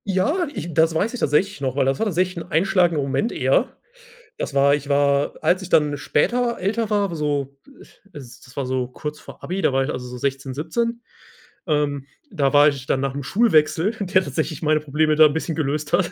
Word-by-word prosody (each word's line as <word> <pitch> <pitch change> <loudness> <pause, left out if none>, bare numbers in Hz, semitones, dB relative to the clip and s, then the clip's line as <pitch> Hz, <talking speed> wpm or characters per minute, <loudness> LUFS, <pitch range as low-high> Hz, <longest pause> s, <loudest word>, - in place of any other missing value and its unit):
Ja, 205 - 0
ich 170 - -6
das 160 +2 +3
weiß 210 +9 0
ich 250 - -5
tatsächlich 170 +3 +1
noch, 130 -2 -2
weil 140 - +2
das 135 0 0
war - - +1
tatsächlich 185 -1 -1
einschlagender 170 -2 +2
Moment 140 - -1
eher. - - 0 0.6
Das - - -4
war 140 +1 +4
ich 145 -1 -4
war 140 0 +2
als 180 +1 +2
ich 190 - -8
dann 150 -4 +2
später 235 - 0
älter 215 +4 -1
war, 200 -4 0
so, 145 -3 -2 0.6
s 130 -4 -11
das 125 - -17
war 140 - -2
so 130 -1 -2
kurz 150 +4 -7
vor - - -13
Abi, 185 +3 -3
da 140 - +2
war 135 0 +2
ich, 140 - -3
also, 125 0 -5
so 125 - -8
16, 135 +1 -3
17, 230 - -2 0.6
ähm, 145 -4 -1 0.2
da 145 - 0
war 145 0 +7
ich 140 -3 -1
dann 135 - 0
nach 135 0 -2
'nem 140 - -4
Schulwechsel, 185 - +2
der 185 -1 +2
tatsächlich 140 +1 -3
meine 155 -1 +2
Probleme 155 +1 +1
da 155 0 +7
'n 150 - +3
bisschen 160 +1 -3
gelöst 150 0 -2
hat. 175 0 +2
150 Hz, 210 wpm, -22 LUFS, 140-185 Hz, 0.6 s, war